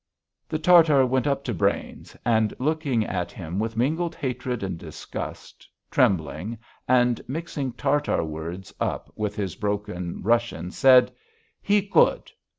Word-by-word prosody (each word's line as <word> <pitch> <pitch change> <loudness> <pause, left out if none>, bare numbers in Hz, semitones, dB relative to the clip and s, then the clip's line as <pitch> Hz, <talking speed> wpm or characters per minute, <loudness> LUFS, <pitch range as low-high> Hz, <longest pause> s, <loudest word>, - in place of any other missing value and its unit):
The 155 - -1
Tartar 155 -4 +6
went 130 0 0
up 140 -1 0
to 125 - -2
Brains, 85 - -2
and, 110 -2 +2
looking 140 -5 0
at 90 -3 -3
him 90 +2 -5
with 110 +1 -3
mingled 160 +8 0
hatred 125 -4 -3
and 95 -2 -3
disgust, 80 - -8 0.2
trembling, 90 +5 +1 0.3
and 125 -2 +3
mixing 140 -3 -4
Tartar 140 - 0
words 80 +4 -6
up - - -3
with 105 -1 -3
his 95 -5 -3
broken 100 -4 -3
Russian, 115 -6 0
said: 130 +2 +6 0.5
"He 205 0 +3
good 195 0 +2
120 Hz, 135 wpm, -25 LUFS, 95-140 Hz, 0.5 s, Tartar